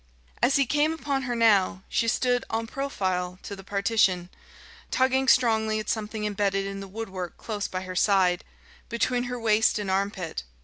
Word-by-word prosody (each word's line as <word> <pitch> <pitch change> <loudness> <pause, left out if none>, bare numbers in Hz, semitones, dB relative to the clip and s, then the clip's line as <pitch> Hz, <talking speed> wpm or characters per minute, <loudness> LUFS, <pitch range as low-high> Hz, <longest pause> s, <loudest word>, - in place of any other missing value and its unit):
As 250 +3 +4
he 275 - +4
came 295 +5 +2
upon 285 -4 -2
her 240 - 0
now, 205 -4 +3
she 230 - 0
stood 245 +1 +1
en 225 +1 -1
profile 185 -9 -2
to 200 - -6
the 195 - -11
partition, 195 -3 +1 0.6
tugging 265 +1 +2
strongly 220 -4 +3
at 215 - -5
something 215 -1 -2
embedded 200 -1 0
in 195 0 -5
the 195 - -7
woodwork 190 -3 -6
close 210 -3 -4
by 185 - -4
her 185 -1 -7
side, 185 -2 +3 0.5
between 245 +1 0
her 245 0 -4
waist 220 -1 +3
and 200 -2 -2
armpit. 190 - -2
215 Hz, 170 wpm, -26 LUFS, 195-240 Hz, 0.6 s, As